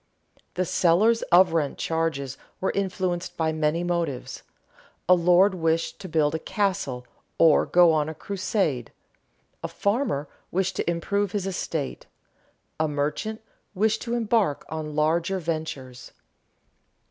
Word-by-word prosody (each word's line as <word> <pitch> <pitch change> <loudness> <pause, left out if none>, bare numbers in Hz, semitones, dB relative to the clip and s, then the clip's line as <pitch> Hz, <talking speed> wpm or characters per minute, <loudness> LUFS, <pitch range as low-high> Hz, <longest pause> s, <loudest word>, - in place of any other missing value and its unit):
_ - - -29
The 185 - 0
sellers 195 +8 +3
of 175 -1 +6
rent 150 -4 0
charges 160 -5 -2 0.2
were 190 - 0
influenced 185 -2 -2
by 160 -1 +1
many 155 +2 0
motives: 170 -7 -2 0.7
a 180 - +7
lord 180 +3 +5
wished 165 -2 -1
to 190 - -8
build 155 -2 +2
a 160 - -1
castle, 185 -12 -2 0.3
or 160 -2 +5
go 175 -2 +5
on 155 0 +1
a 160 - -6
crusade; 185 - -2 0.7
a - - -1
farmer 200 - -1 0.2
wished 190 +1 -1
to - - -1
improve 200 +3 -1
his 200 -3 -1
estate; 165 -6 -4 0.7
a 160 - +2
merchant 150 +10 -2 0.3
wished 220 +3 +1
to 235 -1 -2
embark 220 -9 +1
on 155 -1 -5
larger 165 +5 +1
ventures. 155 -7 -5
170 Hz, 135 wpm, -25 LUFS, 155-190 Hz, 0.7 s, a